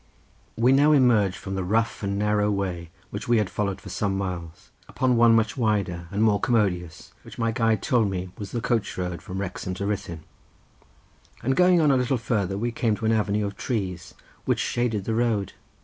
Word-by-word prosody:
We 120 Hz, +3 st, +4 dB
now 145 Hz, +3 st, +5 dB
emerged 115 Hz, -9 st, +4 dB
from 95 Hz, -, -7 dB
the 95 Hz, -1 st, -2 dB
rough 115 Hz, +5 st, 0 dB
and 100 Hz, -1 st, -2 dB
narrow 105 Hz, 0 st, +1 dB
way 90 Hz, -4 st, -3 dB, 0.2 s
which -, -, -6 dB
we 120 Hz, -1 st, +4 dB
had 105 Hz, -4 st, 0 dB
followed 100 Hz, -1 st, -2 dB
for 100 Hz, -, -11 dB
some 100 Hz, +1 st, -1 dB
miles, 90 Hz, -4 st, -6 dB, 0.2 s
upon 130 Hz, -1 st, +1 dB
one 115 Hz, -1 st, +6 dB
much 110 Hz, -1 st, +1 dB
wider, 100 Hz, -8 st, -1 dB
and 100 Hz, +3 st, 0 dB
more 105 Hz, -2 st, +3 dB
commodious, 90 Hz, -8 st, -1 dB
which -, -, -13 dB
my 115 Hz, -1 st, 0 dB
guide 115 Hz, -2 st, +1 dB
told 115 Hz, -5 st, +2 dB
me 90 Hz, -1 st, -4 dB
was 100 Hz, -2 st, -7 dB
the 120 Hz, -, -3 dB
coach 115 Hz, -4 st, -1 dB
road 90 Hz, -1 st, -3 dB
from 95 Hz, +1 st, -6 dB
Wrexham 95 Hz, -1 st, -4 dB
to 100 Hz, -, -4 dB
Ruthyn, 85 Hz, -6 st, -4 dB, 1.2 s
and 135 Hz, +2 st, +1 dB
going 180 Hz, +1 st, +5 dB
on 150 Hz, -2 st, +4 dB
a 135 Hz, -, +3 dB
little 125 Hz, +1 st, +1 dB
farther 105 Hz, -4 st, -1 dB
we 120 Hz, +3 st, -1 dB
came 115 Hz, -2 st, 0 dB
to 110 Hz, -, -5 dB
an 110 Hz, -, +3 dB
avenue 105 Hz, -1 st, +1 dB
of 100 Hz, -, -5 dB
trees 90 Hz, -, -4 dB, 0.3 s
which -, -, +1 dB
shaded 115 Hz, -4 st, -1 dB
the 110 Hz, -, -2 dB
road. 110 Hz, -4 st, 0 dB
105 Hz, 200 wpm, -25 LUFS, 95-115 Hz, 1.2 s, one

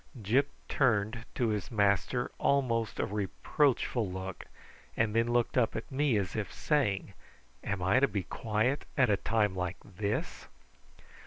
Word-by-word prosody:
Gyp 120 Hz, +7 st, +2 dB, 0.2 s
turned 115 Hz, -2 st, +1 dB
to 120 Hz, -3 st, +1 dB
his 105 Hz, -3 st, -2 dB
master 105 Hz, +3 st, +1 dB
almost 115 Hz, -6 st, +1 dB
a -, -, +2 dB
reproachful 110 Hz, -, 0 dB
look, 95 Hz, 0 st, -6 dB, 0.5 s
and 110 Hz, -1 st, +1 dB
then 115 Hz, 0 st, +3 dB
looked 120 Hz, +1 st, +2 dB
up 115 Hz, -, +1 dB
at -, -, -5 dB
me, 135 Hz, -3 st, +2 dB
as 95 Hz, -3 st, -2 dB
if 105 Hz, -2 st, -3 dB
saying, 105 Hz, -10 st, 0 dB, 0.5 s
"Am 100 Hz, -3 st, -2 dB
I 95 Hz, +8 st, +4 dB
to 140 Hz, -, +4 dB
be 100 Hz, -7 st, -2 dB
quiet 115 Hz, +9 st, -1 dB
at 130 Hz, -5 st, +4 dB
a 100 Hz, -, +3 dB
time 105 Hz, -1 st, +1 dB
like 90 Hz, -1 st, -2 dB
this?" 100 Hz, +2 st, -3 dB
110 Hz, 150 wpm, -31 LUFS, 100-125 Hz, 0.5 s, I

